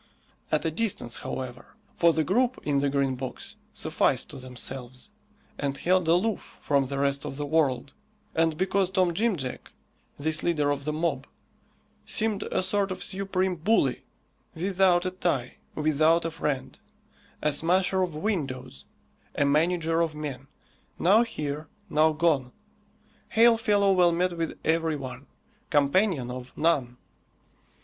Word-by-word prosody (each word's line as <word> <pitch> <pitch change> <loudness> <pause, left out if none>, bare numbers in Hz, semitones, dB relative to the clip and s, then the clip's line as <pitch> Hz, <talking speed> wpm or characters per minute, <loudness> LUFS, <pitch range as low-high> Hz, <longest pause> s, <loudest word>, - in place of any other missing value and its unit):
At 155 +1 +1
a 160 - +1
distance, 170 - -2
however, 125 -2 -6 0.2
for 170 0 +5
the 160 -1 +1
group 245 +8 +1
in 145 -2 +1
the 140 0 +1
Green 140 -1 +1
Box 130 0 -6 0.2
sufficed - - 0
to - - -8
themselves, 130 - -6 0.5
and 140 -1 -2
held 180 -1 +2
aloof 185 +6 0
from 140 -2 +1
the 140 +1 -4
rest 140 0 0
of - - -5
the 145 +1 -3
world, 140 -4 +1 0.4
and 160 -1 +1
because 190 +1 +1
Tom 185 -2 +2
Jim 220 +3 +1
Jack, 130 -5 -6 0.5
this 155 +1 -1
leader 150 -4 +1
of 140 -1 -3
the 155 - 0
mob, 150 -4 -1 0.8
seemed 215 -2 0
a - - -1
sort 200 +1 +1
of 185 - -4
supreme 190 -1 -1
bully, 165 - +2 0.5
without 185 0 +2
a 185 - -1
tie, 170 -9 -2 0.2
without 155 +2 +3
a 165 - -1
friend; 135 -4 -3 0.6
a 150 - +3
smasher 185 +4 +2
of 175 -4 -1
windows, 140 - -3 0.5
a 145 - +2
manager 165 +3 +2
of 160 -2 -1
men, 140 -3 -6 0.5
now 200 +6 +5
here, 155 -10 -3 0.2
now 155 +1 +4
gone, 150 -5 +1 0.8
hail 230 +1 +6
fellow 205 -3 +3
well 180 -2 +5
met 175 +1 0
with 165 -1 -3
every 160 -1 +1
one, 135 -1 -7 0.4
companion 145 - +2
of 125 0 -7
none. 135 -7 +1
160 Hz, 145 wpm, -27 LUFS, 140-185 Hz, 0.8 s, hail